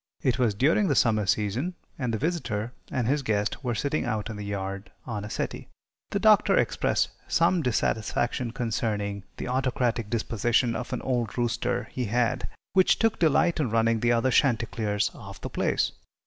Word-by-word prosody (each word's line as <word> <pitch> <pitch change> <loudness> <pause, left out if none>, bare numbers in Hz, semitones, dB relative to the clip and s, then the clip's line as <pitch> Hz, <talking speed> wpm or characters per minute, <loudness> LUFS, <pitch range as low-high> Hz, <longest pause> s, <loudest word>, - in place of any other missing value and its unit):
It 130 -1 +1
was 115 -5 +2
during 160 - +3
the 145 - +2
summer 110 -5 +3
season, 110 - 0 0.2
and 125 -3 -1
the 110 - 0
visitor 125 -7 -2 0.2
and 125 -3 -1
his 145 +3 +2
guest 105 0 -1
were 120 -3 -1
sitting 145 +6 -1
out 110 +1 -2
in - - -6
the 105 - -6
yard 100 0 -4
on 110 -5 -4
a 105 - -6
settee. - - -4 0.4
The - - -1
Doctor - - +5
expressed - - +1 0.2
some 170 +1 +3
dissatisfaction 120 -1 0
concerning 105 -4 -2
the - - -4
autocratic 125 -3 0
disposition 115 +1 +1
of 125 - -5
an - - -3
old 120 -4 -1
rooster 120 +1 0
he 125 - -2
had, 120 +2 0 0.3
which 190 -1 +5
took 225 -1 +1
delight 170 +1 +3
in 140 -6 +1
running 115 0 +2
the 120 +2 +2
other 120 +2 +2
chanticleers 115 -5 +1
off - - -10
the - - -6
place. - - +1
120 Hz, 175 wpm, -27 LUFS, 110-130 Hz, 0.4 s, Doctor